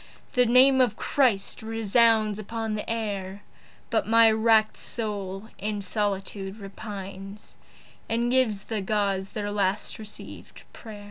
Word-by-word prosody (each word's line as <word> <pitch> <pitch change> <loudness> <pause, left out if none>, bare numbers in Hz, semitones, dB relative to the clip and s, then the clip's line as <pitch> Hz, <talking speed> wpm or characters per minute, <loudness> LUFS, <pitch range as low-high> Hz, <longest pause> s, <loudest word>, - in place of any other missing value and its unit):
The 250 -2 +4
name 260 +2 +6
of 240 -4 +2
Christ 240 -9 +1
resounds 220 -1 +2
upon 225 +1 -4
the 210 - -4
air. 205 -3 -3 0.5
But - - +1
my 225 0 +6
wrack'd 220 0 +3
soul 205 -2 -5
in 210 +1 -2
solitude 195 -1 -2
repines 195 -1 -8 0.5
And 235 +2 0
gives 230 -6 +2
the 220 -2 -3
Gods 195 -1 -1
their 205 -1 -4
last 200 0 -1
receivèd 215 -1 -9
pray'r. 215 -2 -10
215 Hz, 125 wpm, -26 LUFS, 200-225 Hz, 0.5 s, name